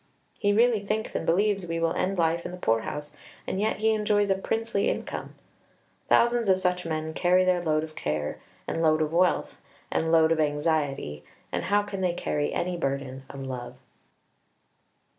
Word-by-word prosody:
He 205 - +2
really 230 +1 +4
thinks 215 +2 -3
and - - -3
believes 195 +1 +2
we 165 0 -2
will 165 0 +1
end 195 +1 -1
life 170 0 +1
in - - -5
the 180 - -7
poor 115 -10 +2
house; 150 +6 -6 0.3
and 190 - -2
yet 215 0 0
he 220 0 +4
enjoys 210 -2 +2
a - - +4
princely 225 +2 -1
income." - - -4 0.7
Thousands 235 -2 +4
of 190 - +5
such 180 -2 -1
men 160 0 -3
carry 180 +2 +3
their 180 -1 +2
load 155 -2 +1
of 155 0 -7
care, 75 0 -3 0.3
and 165 - -2
load 155 -1 +3
of 155 +1 -3
wealth, 180 +1 +1 0.3
and 160 0 0
load 160 -1 +5
of 165 - +2
anxiety, 145 - 0 0.3
and - - -2
how 205 +2 +3
can 195 -2 -5
they 180 -2 +1
carry 150 -3 -1
any 180 0 -2
burden 135 -3 -3
of 135 -1 -7
love? 125 -2 -6
170 Hz, 180 wpm, -27 LUFS, 155-200 Hz, 0.7 s, of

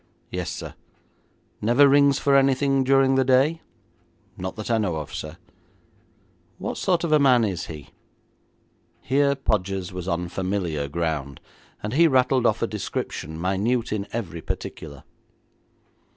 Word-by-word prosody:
'Yes, - - -3
sir.' - - -6 0.9
'Never 120 +6 +5
rings 140 0 +5
for 140 -1 +2
anything 135 0 +3
during 135 0 +4
the 135 0 +3
day?' 135 +6 +3 0.7
'Not 95 0 -5
that 110 +2 -5
I 115 - +3
know 95 -6 -1
of, 75 -2 -6
sir.' 75 +2 -6 1.2
'What - - -4
sort 175 -2 +1
of 170 - -1
a 155 - +5
man 130 -4 +5
is 95 -6 -2
he?' 75 -3 -9 1.1
Here 140 +1 +2
Podgers 95 -7 -2
was 90 -1 -6
on 90 -1 -1
familiar 90 -5 -2
ground, 75 -3 -3 0.4
and 105 +2 -3
he 165 +4 +5
rattled 130 -3 +3
off - - 0
a - - +1
description 80 +2 -5
minute 105 +7 0
in 100 -1 -3
every 90 -8 -5
particular. 70 -3 -7
110 Hz, 140 wpm, -24 LUFS, 90-135 Hz, 1.2 s, Never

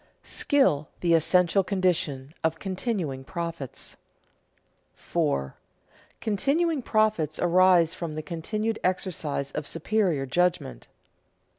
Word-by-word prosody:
[Sidenote: - - -17
Skill 180 - +2
the 170 -1 +3
essential 180 +4 +4
condition 170 -8 -1
of 160 0 +1
continuing 185 - -3
profits] 165 -3 -5 1.0
4. 70 -1 -1 0.7
_Continuing 280 - 0
profits 215 -10 +1
arise 175 -1 +4
from 165 -3 -5
the 155 - -4
continued 215 +7 -3
exercise 165 -6 -2
of 150 - -4
superior 170 -4 0
judgment. 165 - -1
175 Hz, 100 wpm, -26 LUFS, 155-200 Hz, 1.0 s, essential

